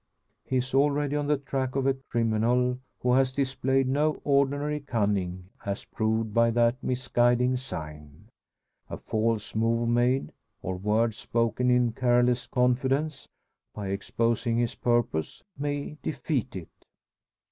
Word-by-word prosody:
He 130 Hz, -, -1 dB
is 130 Hz, +1 st, -2 dB
already 145 Hz, +1 st, +2 dB
on 145 Hz, -1 st, -1 dB
the 150 Hz, 0 st, +2 dB
track 135 Hz, -1 st, -3 dB
of 135 Hz, -1 st, 0 dB
a 135 Hz, -, +4 dB
criminal 125 Hz, -1 st, 0 dB, 0.2 s
who 125 Hz, 0 st, +2 dB
has 130 Hz, 0 st, +3 dB
displayed 135 Hz, 0 st, 0 dB
no 150 Hz, +3 st, +1 dB
ordinary 145 Hz, +1 st, +1 dB
cunning, 100 Hz, -8 st, -1 dB
as 100 Hz, 0 st, -4 dB
proved 110 Hz, 0 st, -1 dB
by 115 Hz, +1 st, +4 dB
that 120 Hz, +2 st, +2 dB
misguiding 125 Hz, 0 st, +2 dB
sign. 75 Hz, -, -7 dB, 0.6 s
A -, -, -5 dB
false 110 Hz, -1 st, -1 dB
move 115 Hz, +1 st, +1 dB
made, 120 Hz, +3 st, +2 dB, 0.3 s
or 95 Hz, -, -2 dB
word 105 Hz, +4 st, +1 dB
spoken 115 Hz, +3 st, 0 dB
in 125 Hz, -1 st, +3 dB
careless 120 Hz, 0 st, +2 dB
confidence, 135 Hz, +4 st, 0 dB, 0.5 s
by 100 Hz, -2 st, -4 dB
exposing 115 Hz, +4 st, 0 dB
his 120 Hz, -1 st, 0 dB
purpose, 120 Hz, -10 st, -1 dB
may 145 Hz, +1 st, -4 dB
defeat 130 Hz, -3 st, -2 dB
it. 90 Hz, -4 st, -10 dB
125 Hz, 130 wpm, -27 LUFS, 115-135 Hz, 0.6 s, a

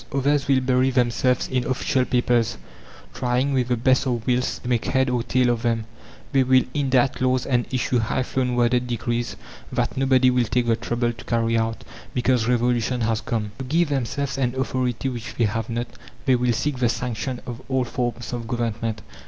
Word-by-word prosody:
Others 140 Hz, +1 st, +1 dB
will 135 Hz, -2 st, +3 dB
bury 130 Hz, 0 st, +2 dB
themselves 125 Hz, 0 st, +1 dB
in 130 Hz, -1 st, 0 dB
official 130 Hz, +1 st, 0 dB
papers, 120 Hz, -2 st, +1 dB, 0.6 s
trying, 125 Hz, +3 st, 0 dB
with 125 Hz, -2 st, +1 dB
the 125 Hz, -1 st, +1 dB
best 130 Hz, +3 st, +2 dB
of 120 Hz, -3 st, -1 dB
wills, 125 Hz, 0 st, 0 dB
to -, -, -6 dB
make 120 Hz, -2 st, 0 dB
head 130 Hz, -1 st, +1 dB
or 125 Hz, -1 st, +1 dB
tail 125 Hz, +1 st, +2 dB
of 120 Hz, -1 st, -1 dB
them. 115 Hz, -2 st, 0 dB, 0.5 s
They 135 Hz, -, +4 dB
will 130 Hz, 0 st, +4 dB
indite 135 Hz, -3 st, +1 dB
laws 130 Hz, -1 st, +2 dB
and 120 Hz, -2 st, 0 dB
issue 125 Hz, -1 st, +1 dB
high 115 Hz, +3 st, 0 dB
flown 125 Hz, -1 st, -1 dB
worded 125 Hz, +1 st, +2 dB
decrees 120 Hz, 0 st, -2 dB, 0.4 s
that -, -, -1 dB
nobody 130 Hz, -1 st, +4 dB
will 125 Hz, -1 st, +2 dB
take 120 Hz, +2 st, 0 dB
the 115 Hz, -1 st, +3 dB
trouble 120 Hz, 0 st, -1 dB
to 115 Hz, -, -13 dB
carry 115 Hz, -1 st, +1 dB
out 115 Hz, 0 st, -1 dB, 0.3 s
because 125 Hz, -2 st, +2 dB
revolution 120 Hz, 0 st, +1 dB
has 115 Hz, 0 st, 0 dB
come. 110 Hz, -7 st, -2 dB
To -, -, -3 dB
give 160 Hz, +4 st, +1 dB
themselves 140 Hz, +1 st, -2 dB
an 125 Hz, -1 st, 0 dB
authority 130 Hz, -1 st, -1 dB
which 120 Hz, -2 st, -5 dB
they 120 Hz, -, +2 dB
have 110 Hz, +2 st, -2 dB
not 120 Hz, +1 st, -2 dB, 0.4 s
they 130 Hz, -, +4 dB
will 125 Hz, 0 st, +1 dB
seek 135 Hz, +3 st, -1 dB
the 120 Hz, -2 st, +3 dB
sanction 125 Hz, +1 st, -3 dB
of 120 Hz, 0 st, -6 dB
old 130 Hz, -2 st, +1 dB
forms 120 Hz, -1 st, -3 dB
of 120 Hz, -2 st, -4 dB
Government. 115 Hz, -2 st, -2 dB
125 Hz, 195 wpm, -23 LUFS, 120-130 Hz, 0.6 s, They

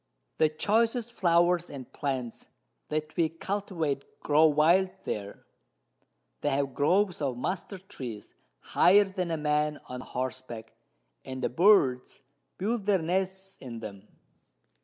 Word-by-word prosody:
The 155 Hz, -, +5 dB
choicest 225 Hz, +8 st, +1 dB
Flowers 175 Hz, 0 st, +3 dB
and 135 Hz, -3 st, -9 dB
Plants 130 Hz, -5 st, -4 dB, 0.4 s
that 155 Hz, 0 st, -3 dB
we 165 Hz, -2 st, +2 dB
cultivate 165 Hz, -5 st, -3 dB, 0.2 s
grow 155 Hz, +2 st, +5 dB
wild 165 Hz, +5 st, +4 dB
there; 100 Hz, -1 st, -5 dB, 1.0 s
they 145 Hz, -, +1 dB
have 140 Hz, -1 st, 0 dB
Groves 180 Hz, +5 st, +2 dB
of 135 Hz, -4 st, -1 dB
Mustard 185 Hz, +5 st, -4 dB
Trees 120 Hz, -, -7 dB, 0.3 s
higher 200 Hz, +3 st, +5 dB
than 190 Hz, -3 st, -3 dB
a 165 Hz, -, -1 dB
Man 150 Hz, 0 st, 0 dB
on 125 Hz, 0 st, -7 dB
Horseback, 125 Hz, -3 st, -5 dB, 0.5 s
and 130 Hz, 0 st, -6 dB
the -, -, +1 dB
Birds 135 Hz, -6 st, +3 dB, 0.4 s
build 210 Hz, +1 st, -2 dB
their 200 Hz, -2 st, +5 dB
Nests 190 Hz, +3 st, -2 dB
in 120 Hz, -3 st, -8 dB
them. 105 Hz, -2 st, -9 dB
155 Hz, 125 wpm, -28 LUFS, 130-190 Hz, 1.0 s, The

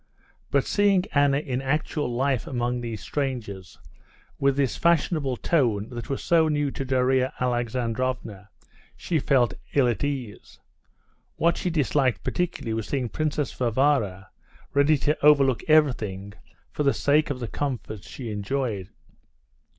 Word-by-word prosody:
But -, -, +2 dB
seeing 200 Hz, -3 st, +3 dB
Anna 140 Hz, -1 st, +4 dB
in 130 Hz, -3 st, -2 dB
actual 145 Hz, -1 st, -1 dB
life 130 Hz, 0 st, 0 dB
among 120 Hz, -1 st, -1 dB
these 115 Hz, -3 st, -5 dB
strangers, 115 Hz, -10 st, -4 dB, 0.6 s
with 140 Hz, 0 st, +2 dB
this 135 Hz, -3 st, +1 dB
fashionable 155 Hz, -5 st, +1 dB
tone 115 Hz, -11 st, +1 dB
that 120 Hz, -2 st, -7 dB
was 135 Hz, -, -3 dB
so 165 Hz, -2 st, +4 dB
new 145 Hz, -2 st, 0 dB
to 135 Hz, -, -4 dB
Darya 130 Hz, +1 st, +1 dB
Alexandrovna, 120 Hz, -3 st, -2 dB, 0.5 s
she 165 Hz, -3 st, -1 dB
felt 130 Hz, -3 st, +2 dB, 0.2 s
ill 135 Hz, -3 st, +4 dB
at 120 Hz, +2 st, -1 dB
ease. 135 Hz, -7 st, -5 dB, 0.8 s
What 170 Hz, +2 st, +2 dB
she 185 Hz, -, -2 dB
disliked 135 Hz, -, +1 dB
particularly 175 Hz, -10 st, -2 dB
was 110 Hz, -1 st, -3 dB
seeing 130 Hz, -4 st, -2 dB
Princess 150 Hz, -2 st, -2 dB
Varvara 115 Hz, -6 st, 0 dB, 0.4 s
ready 140 Hz, +2 st, +4 dB
to 145 Hz, +2 st, -1 dB
overlook 140 Hz, -4 st, +5 dB
everything 110 Hz, -11 st, +2 dB, 0.4 s
for -, -, -4 dB
the 140 Hz, -2 st, +2 dB
sake 150 Hz, +2 st, +2 dB
of 140 Hz, -3 st, -3 dB
the 120 Hz, -, -4 dB
comforts 120 Hz, -6 st, -4 dB
she 120 Hz, -5 st, -6 dB
enjoyed. 105 Hz, -1 st, -3 dB
130 Hz, 135 wpm, -25 LUFS, 120-145 Hz, 0.8 s, overlook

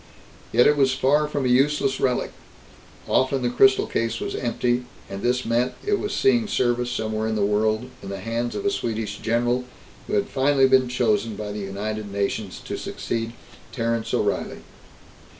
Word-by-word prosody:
Yet 120 Hz, +2 st, +5 dB
it 150 Hz, -, +4 dB
was 135 Hz, -2 st, +3 dB
far 145 Hz, +3 st, +2 dB
from 145 Hz, -2 st, -2 dB
a -, -, +3 dB
useless 135 Hz, +2 st, +2 dB
relic. 125 Hz, -2 st, 0 dB, 0.8 s
Often 130 Hz, 0 st, +1 dB
the 120 Hz, -, +1 dB
crystal 130 Hz, +2 st, +5 dB
case 115 Hz, 0 st, -1 dB
was -, -, -4 dB
empty, 120 Hz, 0 st, -1 dB, 0.2 s
and 100 Hz, 0 st, -6 dB
this 125 Hz, +1 st, 0 dB
meant 120 Hz, +2 st, +1 dB
it 410 Hz, 0 st, +1 dB
was 410 Hz, -, -3 dB
seeing 240 Hz, -, +3 dB
service 120 Hz, -7 st, +1 dB
somewhere 110 Hz, -2 st, -2 dB
in 110 Hz, -, -1 dB
the 105 Hz, -2 st, +2 dB
world, 110 Hz, +3 st, +1 dB
in 100 Hz, -, -8 dB
the 100 Hz, -, -4 dB
hands 115 Hz, +4 st, -3 dB
of 205 Hz, -, -4 dB
a 200 Hz, -, +3 dB
Swedish 110 Hz, -, -3 dB
general 120 Hz, +2 st, +1 dB, 0.4 s
who -, -, -5 dB
had 100 Hz, -, +2 dB
finally 135 Hz, 0 st, +3 dB
been 130 Hz, -1 st, +4 dB
chosen 115 Hz, -3 st, 0 dB
by 105 Hz, 0 st, -5 dB
the 105 Hz, -, -5 dB
United 105 Hz, +1 st, -4 dB
Nations 100 Hz, 0 st, -2 dB
to -, -, -4 dB
succeed 115 Hz, 0 st, -4 dB, 0.4 s
Terence 115 Hz, -1 st, -1 dB
O'Reilly. -, -, -1 dB
120 Hz, 175 wpm, -24 LUFS, 110-130 Hz, 0.8 s, Yet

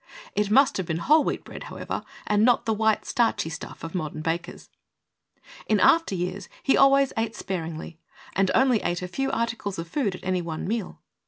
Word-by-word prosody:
It 210 Hz, -1 st, +1 dB
must 265 Hz, +4 st, +4 dB
have 190 Hz, -3 st, -3 dB
been 160 Hz, -, -1 dB
whole 300 Hz, -, +4 dB
wheat -, -, -2 dB
bread, -, -, -9 dB
however, -, -, -5 dB, 0.2 s
and 210 Hz, 0 st, +2 dB
not 245 Hz, 0 st, +4 dB
the 225 Hz, -, +1 dB
white, 220 Hz, 0 st, +1 dB
starchy 230 Hz, -9 st, +1 dB
stuff 150 Hz, -, -8 dB
of 165 Hz, -, -6 dB
modern 155 Hz, -4 st, -3 dB
bakers. 165 Hz, +2 st, -3 dB, 1.0 s
In 215 Hz, -2 st, +3 dB
after 330 Hz, -12 st, +4 dB
years 180 Hz, +2 st, -4 dB
he 270 Hz, -, +4 dB
always 275 Hz, 0 st, +5 dB
ate 225 Hz, 0 st, -1 dB
sparingly, 165 Hz, -3 st, -5 dB, 0.4 s
and 195 Hz, -1 st, +2 dB
only 260 Hz, -4 st, +4 dB
ate 175 Hz, +1 st, -2 dB
a -, -, -3 dB
few 270 Hz, +9 st, -2 dB
articles 225 Hz, -4 st, -2 dB
of 165 Hz, 0 st, -5 dB
food 205 Hz, -, -1 dB
at -, -, -12 dB
any 185 Hz, -1 st, 0 dB
one 165 Hz, -1 st, -5 dB
meal. 220 Hz, -2 st, -4 dB
200 Hz, 190 wpm, -25 LUFS, 175-235 Hz, 1.0 s, always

